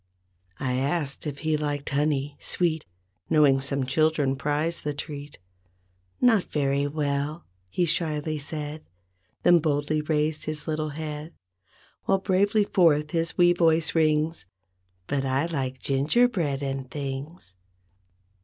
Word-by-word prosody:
I 125 Hz, -1 st, -1 dB
asked 140 Hz, +2 st, -1 dB
if 145 Hz, -1 st, -4 dB
he 155 Hz, -1 st, +2 dB
liked 145 Hz, -1 st, -2 dB
honey, 145 Hz, -1 st, 0 dB
sweet, 160 Hz, -, -1 dB, 0.4 s
Knowing 140 Hz, -3 st, +5 dB
some 140 Hz, -1 st, -1 dB
children 145 Hz, 0 st, +2 dB
prize 150 Hz, +4 st, -1 dB
the 150 Hz, -1 st, -3 dB
treat. 145 Hz, -1 st, -7 dB, 0.8 s
"Not 225 Hz, -6 st, +4 dB
wery 140 Hz, -1 st, +1 dB
well," 145 Hz, +1 st, -2 dB, 0.2 s
he 175 Hz, -, +1 dB
shyly 155 Hz, -2 st, 0 dB
said. 150 Hz, +1 st, -5 dB, 0.6 s
Then 175 Hz, -1 st, +6 dB
boldly 150 Hz, 0 st, 0 dB
raised 150 Hz, 0 st, 0 dB
his 150 Hz, -1 st, -3 dB
little 155 Hz, -1 st, -1 dB
head. 150 Hz, +1 st, -6 dB, 0.7 s
While 195 Hz, -, +3 dB
bravely 200 Hz, +3 st, +2 dB
forth 155 Hz, -6 st, +3 dB
his 165 Hz, 0 st, -1 dB
wee 175 Hz, 0 st, +6 dB
voice 165 Hz, -2 st, +3 dB
rings, 155 Hz, -, +1 dB, 0.6 s
"But 135 Hz, +5 st, -1 dB
I 135 Hz, +3 st, +1 dB
like 135 Hz, -6 st, -3 dB
gingerbread 145 Hz, -, +1 dB
and 135 Hz, -1 st, -3 dB
things." 140 Hz, -, -6 dB
150 Hz, 125 wpm, -26 LUFS, 140-160 Hz, 0.8 s, Then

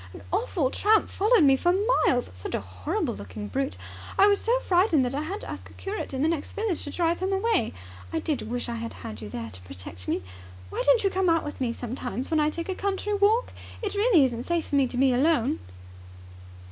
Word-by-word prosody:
An -, -, -10 dB
awful 365 Hz, -, 0 dB
tramp 430 Hz, +1 st, +3 dB
followed 425 Hz, -2 st, +4 dB
me 270 Hz, -2 st, +6 dB
for 350 Hz, +6 st, +2 dB, 0.3 s
miles! 245 Hz, -1 st, +1 dB
Such 90 Hz, 0 st, -5 dB
a -, -, 0 dB
horrible 95 Hz, -1 st, -3 dB
looking 100 Hz, +1 st, -7 dB
brute. 100 Hz, -2 st, -2 dB, 0.4 s
I 395 Hz, -, +7 dB
was 405 Hz, -1 st, +4 dB
so 480 Hz, +2 st, +2 dB
frightened 350 Hz, -, +3 dB
that 245 Hz, -, -2 dB
I 285 Hz, -, -1 dB
had 385 Hz, +7 st, -4 dB
to -, -, -8 dB
ask -, -, -7 dB
a -, -, -15 dB
curate 405 Hz, +2 st, -5 dB
in 265 Hz, 0 st, -1 dB
the -, -, +4 dB
next 320 Hz, -3 st, -2 dB
village 420 Hz, -5 st, -1 dB
to -, -, -5 dB
drive 335 Hz, +2 st, 0 dB
him 375 Hz, +1 st, -1 dB
away. 390 Hz, -, +1 dB, 0.4 s
I -, -, -1 dB
did 265 Hz, -, -2 dB
wish 245 Hz, +1 st, -2 dB
I 235 Hz, -, -3 dB
had 230 Hz, 0 st, -5 dB
had 105 Hz, 0 st, -8 dB
you 105 Hz, -, -7 dB
there 115 Hz, +1 st, -6 dB
to 95 Hz, -, -11 dB
protect 90 Hz, 0 st, -9 dB
me. 95 Hz, -, -1 dB, 0.5 s
Why -, -, -2 dB
don't 420 Hz, +10 st, +5 dB
you 390 Hz, -, +2 dB
come 375 Hz, -1 st, +2 dB
out 330 Hz, -1 st, +3 dB
with 295 Hz, -2 st, -7 dB
me 245 Hz, -2 st, +1 dB
sometimes 245 Hz, +2 st, -5 dB
when 315 Hz, -, +3 dB
I 300 Hz, 0 st, +3 dB
take 335 Hz, +2 st, -5 dB
a -, -, +1 dB
country 400 Hz, +2 st, -2 dB
walk? 415 Hz, +4 st, +3 dB, 0.3 s
It 415 Hz, -, -1 dB
really 405 Hz, -, +5 dB
isn't 240 Hz, -1 st, -3 dB
safe 345 Hz, -1 st, -1 dB
for -, -, 0 dB
me 275 Hz, -2 st, +4 dB
to 245 Hz, -, -5 dB
be 265 Hz, 0 st, +4 dB
alone!" 285 Hz, +1 st, +2 dB
300 Hz, 235 wpm, -26 LUFS, 235-390 Hz, 0.5 s, I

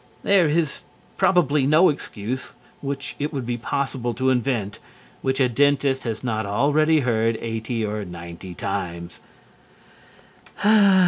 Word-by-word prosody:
There 195 Hz, -4 st, +4 dB
is 155 Hz, -1 st, 0 dB, 0.4 s
probably 150 Hz, -6 st, +3 dB
no 155 Hz, +5 st, +6 dB
excuse 130 Hz, -3 st, -5 dB, 0.3 s
which 140 Hz, 0 st, -4 dB
it 145 Hz, +1 st, -2 dB
would 135 Hz, -5 st, -4 dB
be 120 Hz, 0 st, -1 dB
possible 120 Hz, -1 st, -2 dB
to 130 Hz, +2 st, +2 dB
invent 120 Hz, -5 st, -1 dB, 0.4 s
which 130 Hz, 0 st, -1 dB
a 130 Hz, -, +4 dB
dentist 135 Hz, +1 st, +2 dB
has 115 Hz, 0 st, -3 dB
not 110 Hz, -3 st, -1 dB
already 150 Hz, +9 st, +2 dB
heard 115 Hz, -2 st, +1 dB
eighty 115 Hz, 0 st, -3 dB
or 105 Hz, 0 st, -3 dB
ninety 85 Hz, 0 st, -9 dB
times. 90 Hz, -3 st, -4 dB
125 Hz, 125 wpm, -23 LUFS, 110-140 Hz, 0.4 s, no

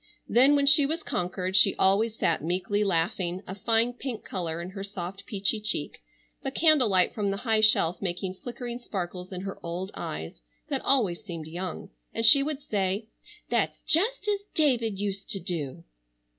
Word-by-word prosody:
Then 265 Hz, +5 st, +5 dB
when 280 Hz, -1 st, +2 dB
she 285 Hz, 0 st, +6 dB
was 320 Hz, +2 st, -3 dB
conquered 185 Hz, +1 st, -2 dB
she 195 Hz, 0 st, +6 dB
always 210 Hz, +4 st, +3 dB
sat -, -, 0 dB
meekly 190 Hz, +5 st, 0 dB
laughing, 175 Hz, 0 st, -1 dB
a 190 Hz, -, -6 dB
fine 225 Hz, +4 st, +2 dB
pink 245 Hz, -3 st, -6 dB
color 170 Hz, -4 st, -3 dB
in 175 Hz, +2 st, -6 dB
her 195 Hz, 0 st, -6 dB
soft 195 Hz, -1 st, -7 dB
peachy 200 Hz, +1 st, 0 dB
cheek, 215 Hz, -, -3 dB, 0.4 s
the 270 Hz, -, -2 dB
candle 300 Hz, -4 st, +4 dB
light 185 Hz, -2 st, +3 dB
from 205 Hz, -2 st, -1 dB
the 195 Hz, -, -2 dB
high 220 Hz, 0 st, +1 dB
shelf 180 Hz, -5 st, +4 dB
making 185 Hz, 0 st, -2 dB
flickering 240 Hz, +3 st, -7 dB
sparkles 185 Hz, -5 st, -6 dB
in 185 Hz, -1 st, -5 dB
her 195 Hz, 0 st, -6 dB
old 180 Hz, +3 st, -4 dB
eyes 75 Hz, -5 st, -6 dB, 0.3 s
that -, -, -1 dB
always 215 Hz, -11 st, +2 dB
seemed 170 Hz, -6 st, -7 dB
young; 175 Hz, +3 st, -6 dB, 0.2 s
and 225 Hz, -, 0 dB
she 275 Hz, +5 st, +9 dB
would 295 Hz, 0 st, -3 dB
say: 205 Hz, -3 st, -2 dB, 0.4 s
"That's -, -, 0 dB
just 420 Hz, +6 st, +1 dB
as 410 Hz, -1 st, +1 dB, 0.2 s
David 240 Hz, -9 st, +1 dB
used 200 Hz, -1 st, -4 dB
to 195 Hz, -, -2 dB
do." 155 Hz, -, -4 dB
200 Hz, 175 wpm, -27 LUFS, 180-240 Hz, 0.4 s, she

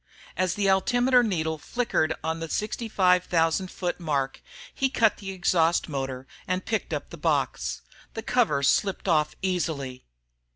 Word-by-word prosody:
As 185 Hz, +1 st, 0 dB
the 205 Hz, -1 st, +1 dB
altimeter 245 Hz, +6 st, +4 dB
needle 160 Hz, -8 st, -1 dB
flickered 160 Hz, -8 st, 0 dB
on 160 Hz, 0 st, -2 dB
the 165 Hz, 0 st, -5 dB
65,000 180 Hz, -5 st, +1 dB
foot 180 Hz, 0 st, -3 dB
mark, 140 Hz, -5 st, -1 dB, 0.3 s
he 270 Hz, -, +1 dB
cut 230 Hz, -5 st, +2 dB
the 195 Hz, -, -7 dB
exhaust 175 Hz, -2 st, +2 dB
motor 135 Hz, -3 st, -4 dB, 0.2 s
and 185 Hz, +1 st, -1 dB
picked 220 Hz, -1 st, -2 dB
up -, -, -4 dB
the -, -, -8 dB
box. -, -, -1 dB, 0.3 s
The 225 Hz, -, -4 dB
cover 225 Hz, -, +2 dB
slipped 195 Hz, +8 st, +1 dB
off 155 Hz, -3 st, +2 dB
easily. 155 Hz, -, -2 dB
180 Hz, 140 wpm, -26 LUFS, 160-210 Hz, 0.3 s, altimeter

